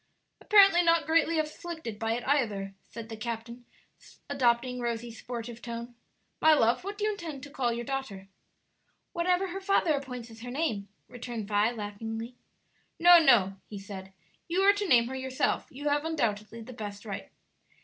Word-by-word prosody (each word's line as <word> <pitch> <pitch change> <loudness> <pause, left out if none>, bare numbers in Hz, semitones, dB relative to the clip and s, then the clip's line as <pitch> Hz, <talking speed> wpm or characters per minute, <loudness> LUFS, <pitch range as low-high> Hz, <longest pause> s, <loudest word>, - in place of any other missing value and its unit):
"Apparently 395 -4 +6
not 335 -2 +3
greatly 325 +1 +2
afflicted 310 - -4
by 225 0 0
it 240 +2 -4
either," 210 -9 0
said 230 -1 -10
the 225 - -7
captain, 235 +2 -6 0.7
adopting 250 -2 +1
Rosie's 235 -1 -4
sportive 235 -1 -6
tone. 235 0 -6 0.5
"My 315 0 +7
love, 240 0 +2
what 400 +2 -5
do 415 - -4
you 430 - +2
intend 325 -9 -7
to 290 - -9
call 255 -4 0
your 235 +1 -4
daughter?" 225 -8 -4 0.9
"Whatever 360 +1 +1
her 385 +2 -5
father 385 -5 +2
appoints 250 -4 -5
as 225 0 -13
her 245 - -7
name," 245 -8 -2 0.2
returned 240 -3 -6
Vi, 210 +1 +3
laughingly. 225 +2 -6 0.6
"No, 350 0 +8
no," 220 - +4
he 210 - -7
said; 195 -1 -9 0.4
"you 350 +3 +1
are 400 +1 +6
to 405 0 -2
name 240 -7 +5
her 260 - -5
yourself; 260 0 -1
you 290 +3 -6
have 290 +1 +1
undoubtedly 230 -8 -2
the 255 +3 -10
best 205 -2 -7
right." 200 -2 -6
245 Hz, 170 wpm, -29 LUFS, 225-315 Hz, 0.9 s, No